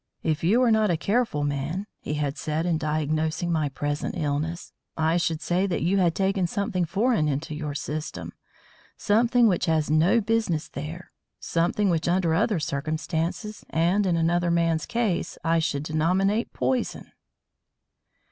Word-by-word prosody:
"If 155 Hz, -1 st, -1 dB
you 215 Hz, +9 st, +4 dB
were 245 Hz, -2 st, +4 dB
not 220 Hz, -1 st, +3 dB
a 170 Hz, -, +2 dB
careful 200 Hz, -5 st, 0 dB
man," 145 Hz, +7 st, -2 dB
he 150 Hz, -, -4 dB
had 145 Hz, -1 st, -1 dB
said 155 Hz, 0 st, -2 dB
in 165 Hz, -3 st, +1 dB
diagnosing 155 Hz, +2 st, -1 dB
my 155 Hz, -3 st, +1 dB
present 145 Hz, +4 st, -3 dB
illness, 155 Hz, +2 st, -2 dB, 0.2 s
"I 160 Hz, +1 st, +2 dB
should 165 Hz, -2 st, -1 dB
say 180 Hz, +4 st, +1 dB
that 180 Hz, -, -1 dB
you 190 Hz, +4 st, +2 dB
had 175 Hz, -3 st, +2 dB
taken 195 Hz, -2 st, +1 dB
something 185 Hz, -1 st, -1 dB
foreign 200 Hz, -1 st, +1 dB
into 150 Hz, +3 st, -2 dB
your 150 Hz, -1 st, -4 dB
system; 150 Hz, +1 st, -5 dB, 0.6 s
something 235 Hz, +3 st, +3 dB
which 180 Hz, -4 st, +1 dB
has 155 Hz, -2 st, +1 dB
no 165 Hz, +9 st, +4 dB
business 220 Hz, -8 st, 0 dB
there; 160 Hz, +5 st, -7 dB, 0.3 s
something 175 Hz, +4 st, +1 dB
which 165 Hz, -1 st, 0 dB
under 175 Hz, -2 st, +2 dB
other 205 Hz, +2 st, +2 dB
circumstances 160 Hz, -, -3 dB
and 180 Hz, +5 st, +2 dB
in 170 Hz, -2 st, +2 dB
another 170 Hz, +1 st, +1 dB
man's 165 Hz, -2 st, +1 dB
case 230 Hz, -6 st, -1 dB
I 165 Hz, 0 st, +2 dB
should 145 Hz, -3 st, -1 dB
denominate 185 Hz, +8 st, +1 dB
poison." 255 Hz, -2 st, -2 dB
165 Hz, 155 wpm, -25 LUFS, 155-195 Hz, 0.6 s, you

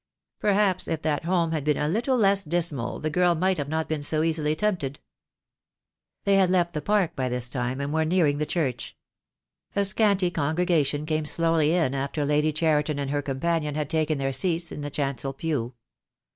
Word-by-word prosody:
Perhaps 200 Hz, -3 st, +1 dB
if 160 Hz, -1 st, -3 dB
that 155 Hz, 0 st, -1 dB
home 170 Hz, -2 st, +1 dB
had 155 Hz, -3 st, -1 dB
been 150 Hz, -1 st, +1 dB
a 150 Hz, -, 0 dB
little 235 Hz, -, +1 dB
less 200 Hz, -3 st, +3 dB
dismal 155 Hz, -7 st, -2 dB
the 155 Hz, -, -2 dB
girl 180 Hz, +1 st, +3 dB
might 185 Hz, +1 st, +1 dB
not 145 Hz, 0 st, -3 dB
have 160 Hz, 0 st, -1 dB
been 155 Hz, -2 st, -2 dB
so 155 Hz, +2 st, +1 dB
easily 155 Hz, -2 st, 0 dB
tempted." 160 Hz, -8 st, -1 dB, 1.2 s
They 200 Hz, -1 st, +3 dB
had 190 Hz, -2 st, +4 dB
left 175 Hz, -2 st, +1 dB
the 150 Hz, -, -3 dB
park 190 Hz, -1 st, +1 dB
by 130 Hz, -2 st, -1 dB
this 125 Hz, -1 st, -2 dB
time 125 Hz, +1 st, -3 dB
and 140 Hz, +1 st, -3 dB
were 160 Hz, 0 st, +2 dB
near 170 Hz, +2 st, +2 dB
ing 145 Hz, 0 st, +1 dB
the 150 Hz, -, -1 dB
church. 145 Hz, -8 st, -2 dB, 0.8 s
A 200 Hz, 0 st, +2 dB
scanty 200 Hz, -3 st, +2 dB
congregation 155 Hz, -2 st, 0 dB
came 155 Hz, 0 st, -1 dB
slowly 165 Hz, 0 st, +2 dB
in 160 Hz, -7 st, +1 dB
after 140 Hz, +2 st, -2 dB
Lady 150 Hz, +2 st, +2 dB
Cheriton 150 Hz, -1 st, +1 dB
and 140 Hz, -1 st, -3 dB
her 145 Hz, 0 st, 0 dB
companion 150 Hz, +2 st, -1 dB
had 150 Hz, -2 st, -2 dB
taken 155 Hz, -1 st, +1 dB
their 135 Hz, 0 st, -1 dB
seats 170 Hz, +3 st, 0 dB
in -, -, -6 dB
the 145 Hz, -, -4 dB
chancel 135 Hz, -2 st, -3 dB
pew. 135 Hz, -5 st, -3 dB
155 Hz, 195 wpm, -25 LUFS, 145-175 Hz, 1.2 s, had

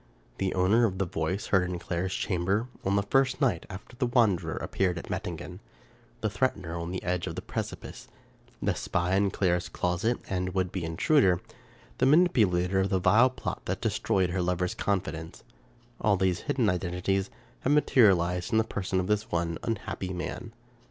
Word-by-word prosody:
The 95 Hz, -1 st, -1 dB
owner 100 Hz, +6 st, +4 dB
of 95 Hz, -2 st, -5 dB
the 95 Hz, -, 0 dB
voice 85 Hz, +2 st, -2 dB
heard 90 Hz, -2 st, +4 dB
in 90 Hz, -, -3 dB
Clara's 90 Hz, +1 st, -3 dB
chamber, 95 Hz, +4 st, 0 dB, 0.2 s
on 95 Hz, +1 st, +1 dB
the 100 Hz, -, +2 dB
first 135 Hz, +5 st, +2 dB
night 120 Hz, -, +1 dB
after 95 Hz, +6 st, -10 dB
the 125 Hz, +1 st, 0 dB
wanderer 100 Hz, -9 st, +2 dB
appeared 90 Hz, -2 st, -1 dB
at -, -, -7 dB
Mettingen; 90 Hz, +2 st, -5 dB, 0.6 s
the 110 Hz, -, 0 dB
threatener 95 Hz, -9 st, -1 dB
on 85 Hz, 0 st, -4 dB
the 95 Hz, +1 st, -4 dB
edge 90 Hz, -1 st, -1 dB
of -, -, -4 dB
the -, -, -4 dB
precipice; -, -, -6 dB, 0.6 s
the -, -, +2 dB
spy 90 Hz, +1 st, -1 dB
in 100 Hz, 0 st, +3 dB
Clara's 90 Hz, -2 st, 0 dB
closet, 95 Hz, +7 st, 0 dB
and 90 Hz, 0 st, -2 dB
would 95 Hz, -1 st, 0 dB
be 95 Hz, -, -3 dB
intruder; 90 Hz, -, +3 dB, 0.6 s
the 130 Hz, -, +4 dB
manipulator 105 Hz, -, +3 dB
of 95 Hz, 0 st, +1 dB
the 95 Hz, -, +2 dB
vile 110 Hz, +7 st, +5 dB
plot 130 Hz, -, -5 dB
that -, -, -2 dB
destroyed 95 Hz, -2 st, +1 dB
her 90 Hz, +1 st, 0 dB
lover's 90 Hz, 0 st, 0 dB
confidence 90 Hz, -5 st, -3 dB, 0.3 s
— 120 Hz, 0 st, -26 dB
all 100 Hz, -2 st, +3 dB
these 90 Hz, -1 st, +1 dB
hidden 125 Hz, -4 st, +2 dB
identities 90 Hz, +1 st, 0 dB, 0.3 s
have 135 Hz, -, 0 dB
materialized 95 Hz, -, +3 dB
in 110 Hz, -, +3 dB
the 110 Hz, -, +4 dB
person 95 Hz, -3 st, -2 dB
of 90 Hz, -, -1 dB
this 105 Hz, +2 st, 0 dB
one 85 Hz, -1 st, -1 dB
un 115 Hz, -, -1 dB
happy 95 Hz, -2 st, -5 dB
man. 110 Hz, +6 st, -5 dB
95 Hz, 180 wpm, -28 LUFS, 90-110 Hz, 0.6 s, vile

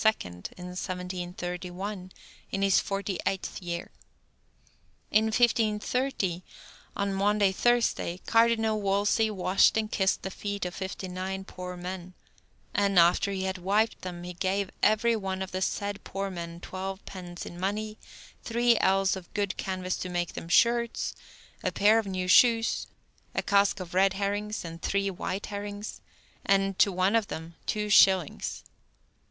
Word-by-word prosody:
in 90 Hz, 0 st, -9 dB, 0.3 s
1731, 180 Hz, +1 st, -5 dB, 0.4 s
in 195 Hz, -, -2 dB
his 195 Hz, -1 st, +5 dB
forty 195 Hz, -1 st, -3 dB
eighth 190 Hz, 0 st, -3 dB
year. 170 Hz, -1 st, -4 dB, 1.2 s
In 215 Hz, +1 st, +4 dB
1530, 220 Hz, -3 st, +1 dB, 0.5 s
on 200 Hz, 0 st, -1 dB
Maundy 200 Hz, 0 st, +3 dB
Thursday, 235 Hz, -5 st, +1 dB
Cardinal 225 Hz, -2 st, +3 dB
Wolsey 205 Hz, +3 st, +2 dB
washed 190 Hz, 0 st, +3 dB
and 215 Hz, 0 st, -1 dB
kissed 190 Hz, -1 st, +1 dB
the 190 Hz, -, -4 dB
feet 200 Hz, 0 st, -4 dB
of 180 Hz, -, -4 dB
fifty 190 Hz, 0 st, -5 dB
nine 190 Hz, +1 st, -4 dB
poor 180 Hz, -1 st, -7 dB
men, 180 Hz, 0 st, -6 dB, 0.6 s
"and, 200 Hz, -2 st, +2 dB
after 175 Hz, +3 st, +5 dB
he 190 Hz, -1 st, -2 dB
had 190 Hz, 0 st, -2 dB
wiped 205 Hz, +5 st, +1 dB
them, 175 Hz, -1 st, -6 dB
he 180 Hz, 0 st, -6 dB
gave 190 Hz, +2 st, -1 dB
every 230 Hz, +2 st, +4 dB
one 190 Hz, -3 st, -3 dB
of 190 Hz, -, -8 dB
the 185 Hz, -, -3 dB
said 205 Hz, +1 st, -2 dB
poor 195 Hz, 0 st, -4 dB
men 170 Hz, -1 st, -6 dB
twelve 190 Hz, +1 st, -6 dB
pence 175 Hz, -2 st, -8 dB
in 175 Hz, -, -9 dB
money, 215 Hz, +3 st, -2 dB, 0.4 s
three 235 Hz, 0 st, +3 dB
ells 195 Hz, 0 st, +3 dB
of 185 Hz, -2 st, -10 dB
good 200 Hz, -2 st, 0 dB
canvas 185 Hz, -1 st, -3 dB
to 185 Hz, -, -4 dB
make 175 Hz, -1 st, -2 dB
them 165 Hz, -, -7 dB
shirts, 235 Hz, +5 st, +3 dB, 0.5 s
a -, -, +1 dB
pair 215 Hz, +2 st, +5 dB
of 220 Hz, -, -3 dB
new 185 Hz, -1 st, -2 dB
shoes, 230 Hz, +3 st, +5 dB, 0.5 s
a -, -, 0 dB
cask 200 Hz, 0 st, +3 dB
of 180 Hz, -1 st, -7 dB
red 190 Hz, +1 st, +4 dB
herrings 205 Hz, +1 st, -2 dB
and 165 Hz, 0 st, -8 dB
three 200 Hz, 0 st, 0 dB
white 190 Hz, +2 st, -4 dB
herrings, 205 Hz, +1 st, -6 dB, 0.4 s
and, 195 Hz, -1 st, +2 dB
to 200 Hz, -, +5 dB
one 185 Hz, +3 st, +2 dB
of 225 Hz, -3 st, +2 dB
them, 160 Hz, +1 st, -7 dB
two 210 Hz, 0 st, -1 dB
shillings." 190 Hz, -5 st, +4 dB
195 Hz, 150 wpm, -28 LUFS, 185-210 Hz, 1.2 s, his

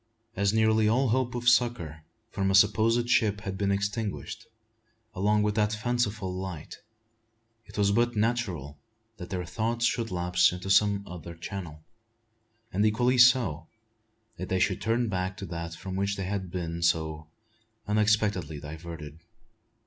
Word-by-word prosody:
As 100 Hz, +1 st, +2 dB
nearly 110 Hz, 0 st, +3 dB
all 125 Hz, +4 st, +2 dB
hope 125 Hz, +1 st, 0 dB
of 120 Hz, 0 st, -4 dB
succour 120 Hz, -11 st, +2 dB, 0.3 s
from 95 Hz, -1 st, 0 dB
a 95 Hz, -, +3 dB
supposed 110 Hz, +4 st, +4 dB
ship 105 Hz, -4 st, +2 dB
had 95 Hz, -3 st, -4 dB
been 100 Hz, 0 st, 0 dB
extinguished, 100 Hz, +1 st, -3 dB, 0.7 s
along 105 Hz, +2 st, +2 dB
with 105 Hz, 0 st, +1 dB
that 105 Hz, 0 st, +1 dB
fanciful 110 Hz, -4 st, -1 dB
light, 90 Hz, -4 st, -7 dB, 0.9 s
it -, -, -12 dB
was 100 Hz, -1 st, +3 dB
but 120 Hz, +3 st, +1 dB
natural 100 Hz, -, -1 dB, 0.4 s
that 90 Hz, -, -8 dB
their 90 Hz, -2 st, -3 dB
thoughts 115 Hz, +6 st, -1 dB
should 115 Hz, -1 st, 0 dB
lapse 90 Hz, -1 st, +2 dB
into 90 Hz, +2 st, -4 dB
some 100 Hz, 0 st, +4 dB
other 85 Hz, -1 st, -9 dB
channel; 85 Hz, -3 st, -7 dB, 0.9 s
and 100 Hz, +3 st, +2 dB
equally 120 Hz, +4 st, +2 dB
so, 115 Hz, -, +4 dB, 0.7 s
that 90 Hz, +2 st, -6 dB
they 95 Hz, -, +1 dB
should 95 Hz, 0 st, +1 dB
turn 115 Hz, +2 st, +1 dB
back 95 Hz, -2 st, -2 dB
to 100 Hz, -, -6 dB
that 85 Hz, -1 st, -6 dB
from 95 Hz, +2 st, -7 dB
which 100 Hz, +1 st, 0 dB
they 95 Hz, -, -4 dB
had 95 Hz, -1 st, -3 dB
been 85 Hz, -2 st, -4 dB
so 80 Hz, -2 st, 0 dB, 0.6 s
unexpectedly 105 Hz, -7 st, +1 dB
diverted. 80 Hz, 0 st, -9 dB
100 Hz, 150 wpm, -28 LUFS, 90-110 Hz, 0.9 s, supposed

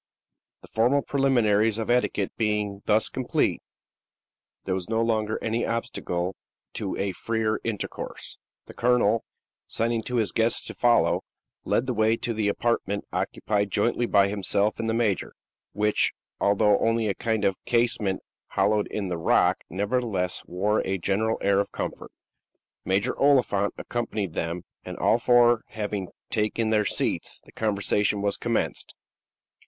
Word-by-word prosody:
The -, -, -12 dB
formal 125 Hz, +5 st, +2 dB
preliminaries 115 Hz, -6 st, +2 dB
of 115 Hz, +1 st, -1 dB
etiquette 120 Hz, -5 st, +1 dB
being 105 Hz, -2 st, -1 dB
thus 110 Hz, 0 st, +3 dB
complete, 130 Hz, -2 st, 0 dB, 1.0 s
there 95 Hz, -, -1 dB
was 95 Hz, 0 st, -4 dB
no 115 Hz, 0 st, +1 dB
longer 110 Hz, -1 st, 0 dB
any 115 Hz, +1 st, 0 dB
obstacle 95 Hz, -5 st, -2 dB, 0.4 s
to 100 Hz, -3 st, -3 dB
a 100 Hz, 0 st, -1 dB
freer 110 Hz, +2 st, -1 dB
intercourse. 110 Hz, -3 st, -5 dB, 0.3 s
The -, -, -12 dB
colonel, 115 Hz, -2 st, +2 dB, 0.4 s
signing 115 Hz, 0 st, 0 dB
to 125 Hz, -, -3 dB
his 110 Hz, -4 st, +1 dB
guests 115 Hz, +1 st, +1 dB
to -, -, -6 dB
follow, 120 Hz, -1 st, +3 dB, 0.4 s
led 120 Hz, -, +1 dB
the 130 Hz, -, -1 dB
way 110 Hz, 0 st, +2 dB
to 115 Hz, -, -2 dB
the 110 Hz, -2 st, 0 dB
apartment 100 Hz, -1 st, -1 dB
occupied 105 Hz, -1 st, -1 dB
jointly 120 Hz, +4 st, +1 dB
by 100 Hz, -2 st, +4 dB
himself 100 Hz, +1 st, 0 dB
and 115 Hz, -, -1 dB
the 110 Hz, -, +1 dB
major, 110 Hz, -6 st, 0 dB, 0.4 s
which, 105 Hz, +1 st, +1 dB, 0.3 s
although 100 Hz, 0 st, +3 dB
only 115 Hz, 0 st, +1 dB
a 100 Hz, -, +1 dB
kind 110 Hz, 0 st, -1 dB
of 95 Hz, -1 st, 0 dB
casemate 115 Hz, -5 st, +1 dB, 0.3 s
hollowed 105 Hz, +1 st, +1 dB
in 100 Hz, -2 st, -3 dB
the 90 Hz, -2 st, -3 dB
rock, 80 Hz, -, +3 dB
nevertheless 100 Hz, -2 st, -1 dB
wore 100 Hz, +5 st, +1 dB
a 95 Hz, 0 st, -1 dB
general 100 Hz, +5 st, 0 dB
air 100 Hz, 0 st, +3 dB
of 100 Hz, -, -1 dB
comfort. -, -, -5 dB, 0.7 s
Major 100 Hz, +7 st, 0 dB
Oliphant 125 Hz, -8 st, +3 dB
accompanied 110 Hz, -7 st, -3 dB
them, 85 Hz, +2 st, -3 dB, 0.2 s
and -, -, -7 dB
all 115 Hz, -, +3 dB
four 120 Hz, 0 st, +5 dB
having 105 Hz, -3 st, -4 dB, 0.2 s
taken 110 Hz, +1 st, 0 dB
their 105 Hz, -1 st, +3 dB
seats, -, -, -1 dB
the -, -, -17 dB
conversation 105 Hz, -1 st, +1 dB
was 100 Hz, -1 st, +1 dB
commenced. -, -, -2 dB
110 Hz, 145 wpm, -26 LUFS, 100-115 Hz, 1.0 s, four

